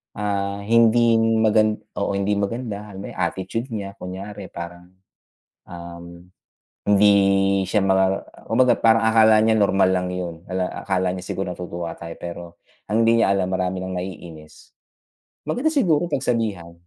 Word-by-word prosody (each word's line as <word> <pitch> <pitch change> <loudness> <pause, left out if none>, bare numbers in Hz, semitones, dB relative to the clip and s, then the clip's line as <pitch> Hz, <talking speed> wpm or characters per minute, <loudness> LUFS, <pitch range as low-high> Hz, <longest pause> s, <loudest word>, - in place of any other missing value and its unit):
ah, 100 -1 -2
hindi 115 +1 +4
magan 110 -1 +2 0.2
oo 100 - -1
hindi 100 +1 0
maganda, 105 0 -4
yung 95 - -8
attitude 95 +7 -3
niya, 100 -2 -5
kunyari 95 +1 -8
parang, 85 +1 -9 0.8
um, 85 0 -10 0.6
hindi 105 0 +5 0.6
siya 105 -3 +1
ma 95 0 +2 0.2
kumbaga 120 +2 +4
parang 115 0 +4
akala 110 -1 +5
niya 110 - +3
normal 95 -2 +3
lang 90 -1 0
yun. 90 -2 -5
Akala 95 0 -1
niya 90 - -5
siguro 95 0 -4
natutuwa 85 -1 -6
tayo, 85 0 -8
pero, 85 0 -7 0.4
ang 110 +2 +2
hindi 115 0 +4
niya - - +3
alam 95 -1 -1
marami 95 0 -2
nang 95 - -5
naiinis. 85 -4 -10 0.7
Maganda 250 - 0
siguro 175 - +1
pagsabihan, 110 - -2
100 Hz, 135 wpm, -22 LUFS, 90-110 Hz, 0.8 s, hindi